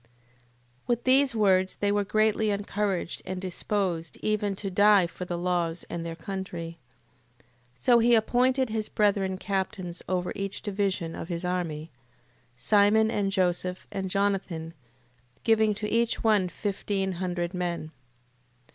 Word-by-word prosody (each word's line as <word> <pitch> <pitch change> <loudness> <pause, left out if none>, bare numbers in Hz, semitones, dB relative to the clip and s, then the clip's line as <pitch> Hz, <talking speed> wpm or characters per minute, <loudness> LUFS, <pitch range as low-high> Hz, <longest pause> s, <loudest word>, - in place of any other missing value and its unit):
8:21. - - -36
With 240 -1 0
these 260 -1 +4
words 190 -3 +3
they 205 0 0
were 205 0 +2
greatly 215 +1 +2
encouraged 200 -3 -2
and 185 0 -4
disposed 185 -2 -2
even 210 -2 0
to 195 0 -5
die 205 0 +5
for 180 +1 -7
the 175 -1 -3
laws 175 -1 -1
and 170 - -3
their 165 0 -5
country. 170 -2 -6 0.6
8:22. - - -29 0.3
So 235 - +4
he 235 +1 +5
appointed 255 +3 +2
his 220 -1 -2
brethren 200 -3 +1
captains 190 -2 -3
over 180 -1 -1
each 195 -1 -4
division 195 -5 -1
of - - -6
his 175 0 -4
army; 165 -3 -3 0.6
Simon, 215 - +4
and 195 -1 0
Joseph, 180 -1 0
and 190 -1 -3
Jonathan, 190 -5 -1 0.7
giving 220 -2 +3
to 210 +1 -3
each 230 +1 0
one 210 -5 +3
fifteen 195 0 -2
hundred 175 -1 -3
men. 175 -3 -3
195 Hz, 140 wpm, -27 LUFS, 180-210 Hz, 0.7 s, die